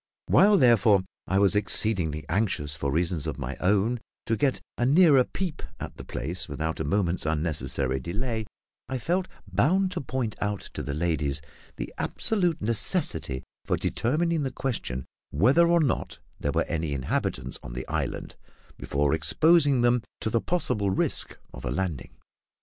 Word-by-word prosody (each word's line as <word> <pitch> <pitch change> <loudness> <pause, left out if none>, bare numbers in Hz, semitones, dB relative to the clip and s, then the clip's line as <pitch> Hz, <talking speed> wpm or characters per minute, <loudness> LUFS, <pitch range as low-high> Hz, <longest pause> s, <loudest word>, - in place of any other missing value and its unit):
While, 205 +1 +6
therefore, 110 - +5 0.2
I 95 - +1
was 100 0 +4
exceedingly 90 -7 +1
anxious, 80 -9 0
for 70 -2 -2
reasons 85 0 0
of - - -3
my 65 +4 -4
own, 105 +5 +2 0.3
to 115 - +1
get 135 +4 +1 0.2
a - - -1
nearer 145 0 +6
peep 175 +3 -4 0.2
at - - -7
the - - -8
place - - -4
without 80 0 -3
a - - 0
moment's 90 +3 0
unnecessary 70 -4 0
delay, 110 - -3 0.4
I 130 - -1
felt 180 +8 -1 0.2
bound 190 +3 +2
to 180 - -3
point 125 -4 -3
out 105 -1 -1
to - - -4
the 70 - -4
ladies 75 -4 0 0.4
the - - -6
absolute 180 - +1
necessity 105 - +1 0.2
for - - +1
determining 160 +6 0
the 135 - -1
question 105 - -3 0.2
whether 130 - +4
or 170 0 +4
not 140 -6 -1 0.2
there - - -1
were - - +1
any 80 -2 -2
inhabitants 65 -1 -2
on - - -8
the 60 +2 -5
island - - -3 0.4
before 70 +1 0
exposing 145 - +4
them 120 0 +3 0.2
to 110 - -1
the 115 - +2
possible 105 - 0
risk 95 - 0 0.2
of - - -9
a - - -2
landing. 80 -1 -3
105 Hz, 160 wpm, -27 LUFS, -, 0.4 s, While